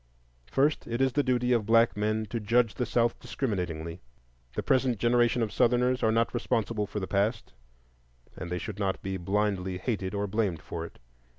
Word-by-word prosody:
First, 145 +3 +1
it 115 +1 -2
is 135 -1 +2
the 145 - +3
duty 125 -2 +1
of 110 -3 +1
black 115 +1 +4
men 110 +1 0
to 115 - -1
judge 115 +1 +2
the 125 - -2
South 115 0 +1
discriminatingly. 90 - -3 0.5
The - - -2
present 130 -3 +2
generation 120 +1 +3
of 110 - -3
Southerners 125 +1 +2
are 110 - +3
not 115 +1 +1
responsible 115 -3 -1
for 105 - -4
the 95 - -3
past, 105 +4 -1 0.8
and 90 - -6
they 90 - -1
should 105 +2 -6
not 95 -2 -1
be 95 0 -2
blindly 95 0 -1
hated 95 -1 -3
or 100 0 0
blamed 100 -5 -1
for 85 0 -5
it. - - -18
110 Hz, 185 wpm, -28 LUFS, 100-120 Hz, 0.8 s, black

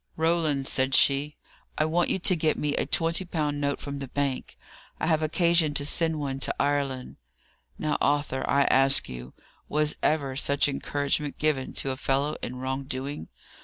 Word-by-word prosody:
'Roland,' 160 -4 +1
said 130 0 +1
she, 145 +2 +2 0.4
'I 155 - +2
want 170 +2 +1
you - - +1
to 185 0 +2
get 155 -1 +1
me 150 -1 0
a - - -1
twenty 165 +2 +1
pound 150 -5 -2
note 140 -1 0
from 140 -1 -5
the 135 - -5
bank; 140 0 -3 0.4
I - - -1
have 160 -1 +2
occasion 165 -1 +2
to 145 - +1
send 160 +1 +1
one 135 -2 -3
to - - -1
Ireland.' 140 -3 -1 0.6
Now, 155 - -1
Arthur, 145 -2 +1
I 140 0 +4
ask 135 0 +4
you, 65 0 -9 0.3
was 150 0 +1
ever 140 -4 +1
such 140 +1 +2
encouragement 145 +1 -1
given 150 -4 0
to 135 - -2
a 130 - -4
fellow 140 +2 0
in 125 - -5
wrong 130 +1 -3
doing? 135 - -5
145 Hz, 175 wpm, -27 LUFS, 135-155 Hz, 0.6 s, I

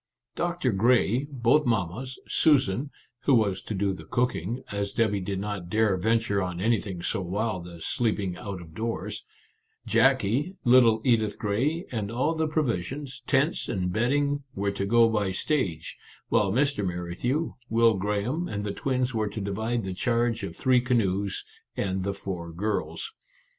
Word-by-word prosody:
Doctor 175 -7 0
Grey, 120 +5 +3
both 135 +2 +2
mammas, 115 +4 -1
Susan 140 - +3 0.3
(who 135 - +3
was 100 -5 +2
to 110 - -5
do 100 0 0
the 95 - -9
cooking, 120 -2 -1
as 100 -1 -2
Debby 105 -3 +1
did 95 +1 -3
not 100 -4 -4
dare 110 -1 +3
ven 110 +5 +2
ture 100 -3 -1
on 90 -1 -3
anything 100 -4 0
so 95 - -1
wild 95 0 -2
as 85 -2 -8
sleeping 105 -6 0
out 100 -2 -6
of 80 -2 -13
doors), 115 +6 -4 0.6
Jackie, 140 - +2
little 120 -3 +6
Edith 110 -4 +2
Grey, 135 - 0
and 110 -5 -2
all 130 +8 0
the 160 -1 0
provisions, 135 - -2
tents, 140 +5 +1
and 90 -2 -1
bedding, 140 +5 +1
were 100 +1 0
to 100 0 -3
go 115 +2 +6
by 105 -4 0
stage, 95 - -1 0.3
while 100 -2 +3
Mr. 135 -1 +1
Merrithew, 90 - -2 0.2
Will 115 0 +4
Graham, 105 - -1
and 100 -7 -3
the 100 -1 -3
twins 130 0 -1
were 110 -2 0
to 105 - -6
divide 110 +4 -2
the 95 -1 -3
charge 115 +3 0
of - - -5
three 130 -2 +3
canoes 100 -6 0 0.3
and 95 -1 -1
the 100 +1 -2
four 90 -4 -5
girls. 105 - -3
110 Hz, 160 wpm, -27 LUFS, 95-125 Hz, 0.6 s, little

